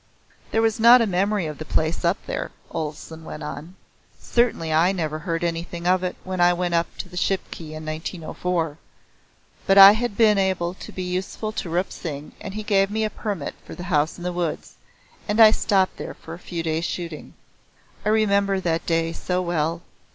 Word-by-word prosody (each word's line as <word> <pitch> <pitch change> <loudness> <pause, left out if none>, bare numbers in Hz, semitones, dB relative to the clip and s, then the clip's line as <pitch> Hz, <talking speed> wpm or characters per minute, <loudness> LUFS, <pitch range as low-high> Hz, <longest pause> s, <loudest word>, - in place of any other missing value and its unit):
"There 225 - +1
was 225 0 +1
not 235 +2 +8
a 230 - +3
memory 200 0 0
of 150 -2 -6
the - - -4
place 160 +2 -1
up 175 +4 +2
there," - - -3 0.2
Olesen 160 +1 -5
went 155 -1 -8
on. 150 +5 -7 0.4
"Certainly 200 -10 +1
I 165 +4 +4
never 155 -5 -2
heard 165 +1 -3
anything 170 0 -3
of 185 +1 +3
it 180 - -2
when 185 -1 -3
I 175 0 +6
went 175 0 -1
up 170 0 +2
to - - -5
the 180 - -13
Shipki 175 -4 -3
in 155 0 -7
1904. 160 0 -3 0.9
But 195 0 +5
I 195 0 +12
had 220 -1 -2
been 215 -3 +5
able 185 -2 0
to - - -10
be 185 - -5
useful 185 +4 -3
to 215 -5 -4
Rup 175 +3 -1
Singh 150 -3 -6
and 195 - -7
he 215 - -4
gave 195 -2 +2
me 220 +1 -1
a 215 - -1
permit 200 -10 -4
for - - -10
The 180 - -7
House 150 +1 +2
in 175 - -9
the 180 0 -2
Woods, 175 -3 -3 0.5
and 210 +1 0
I 220 -1 +9
stopped 195 -4 +1
there - - -6
for 165 - -10
a 170 - -9
few 170 -2 -5
days' 160 +1 -1
shooting. 170 -4 -6 0.7
I 210 - 0
remember 200 -2 +2
that 165 -3 -1
day 165 0 +1
so 180 +1 -2
well. 170 -1 -1
180 Hz, 200 wpm, -23 LUFS, 165-195 Hz, 0.9 s, I